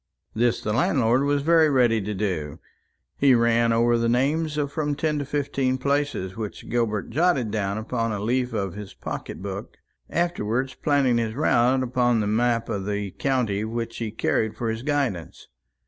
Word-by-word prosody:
This 120 +1 +1
the 105 - -2
landlord 125 +1 +2
was 145 0 +1
very 160 0 +5
ready 120 -5 +3
to 105 +1 -4
do. 90 -8 -2 0.6
He 135 -2 +5
ran 115 0 +3
over 120 +1 +3
the 115 0 +1
names 150 +5 +1
of 145 -2 -1
from 150 -1 -1
ten 150 0 -1
to 145 - -3
fifteen 135 -2 -1
places, 140 -8 -1
which 110 -3 -6
Gilbert 110 -4 -1
jotted 155 -8 +2
down 100 -2 -1
upon 115 +1 -2
a 105 - -3
leaf 125 +4 0
of 100 -5 -2
his 105 -1 -9
pocket - - -6
book, - - -6 0.3
afterwards 130 -7 -1
planning 135 -5 +2
his 110 -1 -2
route 130 -2 +3
upon 120 -2 +1
the 105 - 0
map 115 +2 +1
of 100 -3 -3
the 100 -1 -2
county 120 -7 0
which 115 +1 -4
he 115 -2 -3
carried 110 0 -1
for 115 -2 -1
his 110 +1 -4
guidance. 135 - -2
120 Hz, 175 wpm, -24 LUFS, 110-140 Hz, 0.6 s, very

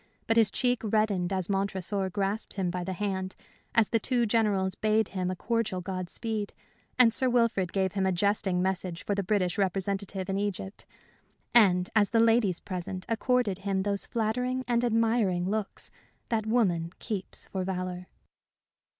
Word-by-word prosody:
But 225 - +1
his 225 -3 +6
cheek 245 +1 +1
reddened 210 -4 +1
as 185 -2 -1
Montresor 195 0 -1
grasped 200 +3 -2
him 185 -3 -1
by 180 0 -3
the 190 +1 -3
hand, 190 -1 -3 0.4
as 225 -3 +4
the 230 - +2
two 245 0 +1
generals 205 -4 +1
bade 215 +1 +1
him 185 -2 -2
a 185 - -2
cordial 225 -2 -1
godspeed, 195 +4 -3 0.4
as 235 -3 +6
Sir 260 +2 +1
Wilfrid 230 -7 +2
gave 190 -1 0
him 195 -2 +1
a - - +2
jesting 190 0 +1
message 185 -2 -2
for 205 - 0
the 200 - 0
British 185 -2 0
representative 195 0 -1
in 195 0 -1
Egypt, 200 -1 -4 0.7
and 185 -6 +5
as 210 -2 +4
the 225 - +2
ladies 225 -5 +3
present 185 0 -5
accorded 230 -3 +1
him 195 -1 -1
those 200 0 -2
flattering 250 +3 -1
and 240 0 +1
admiring 225 -6 +2
looks 210 0 -4 0.4
that 220 -2 0
woman 185 -8 +1
keeps 200 -4 -5
for 190 -1 -3
valor. 180 -1 -4
200 Hz, 160 wpm, -28 LUFS, 185-225 Hz, 0.7 s, his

